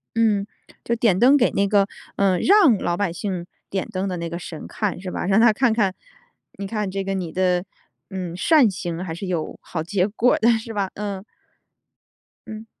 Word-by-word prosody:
嗯， 215 -3 +2 0.4
就 235 - 0
点 225 -5 +2
灯 265 +5 +6
给 250 - +3
那 200 0 +1
个， 200 -1 +3 0.3
呃 190 -3 +2
让 370 - +5
老 175 0 -1
百 205 -4 0
姓 185 -3 -4 0.2
点 190 -1 -2
灯 195 -2 -2
的 180 -2 -3
那 170 0 -4
个 170 +1 -5
神 165 -2 -8
看 205 -5 -3
是 185 0 -6
吧？ - - -3
让 195 +3 +3
他 230 -1 +6
看 240 +2 +2
看 205 -4 +1 0.6
你 200 - -5
看 210 0 -2
这 195 +1 -3
个 195 0 -2
你 180 -4 -3
的， 180 0 +1 0.5
嗯， 185 -3 -5
善 270 - +4
行 175 -2 -4
还 170 -3 -5
是 180 +4 -6
有 170 -4 -3
好 160 -3 -4
结 185 +2 0
果 230 +4 +2
的， 230 - +4
是 225 0 -7
吧？ 200 -3 -1
嗯。 200 -2 -4 1.2
嗯。 220 0 -8
195 Hz, 210 characters per minute, -22 LUFS, 180-220 Hz, 1.2 s, 灯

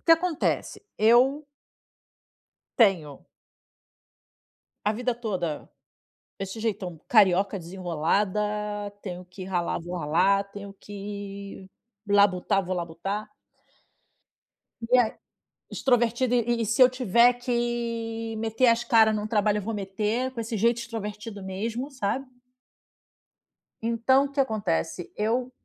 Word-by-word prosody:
o - - -41
que 330 - +7
acontece? 330 +3 0 0.2
Eu 255 +7 +4 1.3
tenho 175 - +2 1.6
a 210 - +2
vida 245 +2 -1
toda 185 -10 -4 0.7
esse 195 +3 -5
jeitão 195 -6 -3
carioca 200 -2 +4
desenrolada, 180 +3 -1 0.6
tenho 180 -2 -6
que 180 +1 -10
ralar, 180 -3 -1
vou 175 +2 -6
ralar, 180 +5 +2
tenho 200 -1 -8
que 200 -1 -8 0.4
labutar, 200 -1 +3
vou 185 +1 -2
labutar. 175 +5 -4 1.6
E 255 - +6
aí 235 -3 +3 0.6
extrovertida 245 0 +1
e 240 0 +1
e - - -1
se 225 +5 +3
eu 255 - +8
tiver 235 +1 +5
que 230 -2 -2
meter 225 +3 +1
as 235 0 +3
cara 225 -4 +5
num 215 0 -1
trabalho 210 -1 +2
eu 210 - -2
vou 225 - -3
meter 210 +5 -2
com 235 - -5
esse 225 0 -4
jeito 235 +3 +3
extrovertido 215 -3 -6
mesmo, 225 +8 -4
sabe. 260 +1 -2 1.5
Então 235 +4 +3
o - - -3
que 280 - -11
acontece? 200 - -1
Eu, 240 +4 0
215 Hz, 115 wpm, -26 LUFS, 195-235 Hz, 1.6 s, eu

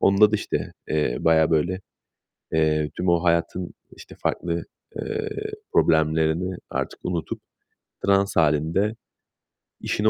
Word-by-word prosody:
Onda 100 +2 +6
da - - +4
işte, - - -3 0.2
eee, 75 -5 +1
bayağı 80 -1 +4
böyle, 85 +4 +1 0.7
eee, 75 -1 +2
tüm 90 0 0
o 85 0 +3
hayatın, 85 +1 0 0.2
işte, - - -12
farklı, 85 -1 -1 0.3
eee, 440 0 -3 0.4
problemlerini 80 +3 +2
artık - - -3
unutup, 85 -3 -3 0.7
trans 100 0 +3
hâlinde 80 +7 +2 0.9
işine 110 +1 +1
85 Hz, 115 wpm, -24 LUFS, 80-95 Hz, 0.9 s, Onda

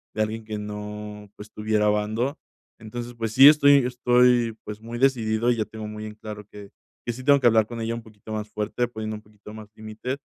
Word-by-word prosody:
de 110 - 0
alguien 110 +1 -4
que 110 -1 -5
no, 105 0 -7
pues, 105 +1 -10
tuviera 105 0 0
bando. 110 +7 -1 0.4
Entonces, 120 +2 -7
pues 115 -2 -3
sí, 135 +4 +9
estoy 140 -3 +5
estoy, 125 -2 +3
pues, 105 0 -7
muy 115 +1 -7
decidido 120 -3 +2
y - - +1
ya 110 - 0
tengo 110 -1 -8
muy 105 0 -7
en 105 0 -8
claro 105 -1 -9
que 100 -1 -11 0.4
que 120 - -2
sí 130 +2 -9
tengo 140 +1 +5
que 125 - +4
hablar 110 -2 +4
con 120 0 -7
ella 115 +1 -2
un 115 - -7
poquito 110 0 -11
más 105 0 -4
fuerte, 105 +4 -2
poniendo 110 -2 -5
un - - -13
poquito 105 0 -14
más 110 -1 -10
límite, 110 +5 -5
110 Hz, 220 wpm, -24 LUFS, 105-120 Hz, 0.4 s, sí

